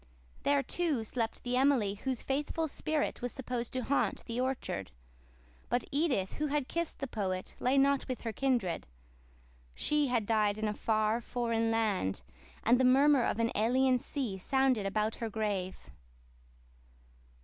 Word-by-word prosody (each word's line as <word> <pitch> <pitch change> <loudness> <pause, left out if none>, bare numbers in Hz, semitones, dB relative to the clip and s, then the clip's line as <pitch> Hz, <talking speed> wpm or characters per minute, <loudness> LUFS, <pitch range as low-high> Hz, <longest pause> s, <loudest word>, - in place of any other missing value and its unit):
There, 285 -1 +2
too, 310 -9 0
slept 225 0 -3
the 245 0 -1
Emily 255 -7 +3
whose 250 +4 -3
faithful 295 +4 -1
spirit 310 0 -1
was 245 0 -2
supposed 245 -3 -4
to 255 -1 -1
haunt 280 +4 0
the 235 +1 -2
orchard; 255 - -2 0.8
but 245 - +1
Edith 275 - +1
who 300 - -1
had 290 -2 -1
kissed 335 -1 -2
the 275 - -3
poet 190 -7 -3
lay 255 +2 +2
not 275 0 +3
with 255 -2 -4
her 225 -2 -3
kindred. 240 -9 0 0.9
She 300 -1 +1
had 240 -4 +1
died 210 -1 +2
in 215 0 -1
a 210 - -1
far, 215 +1 +1
foreign 230 -1 0
land, 210 - 0 0.4
and 240 +2 +4
the - - +3
murmur 270 +2 +5
of - - 0
an 230 0 +1
alien 255 +4 +3
sea 240 -8 -3
sounded 260 -2 +2
about 215 +2 -1
her 230 - -3
grave. 205 -4 -3
245 Hz, 155 wpm, -32 LUFS, 215-270 Hz, 0.9 s, murmur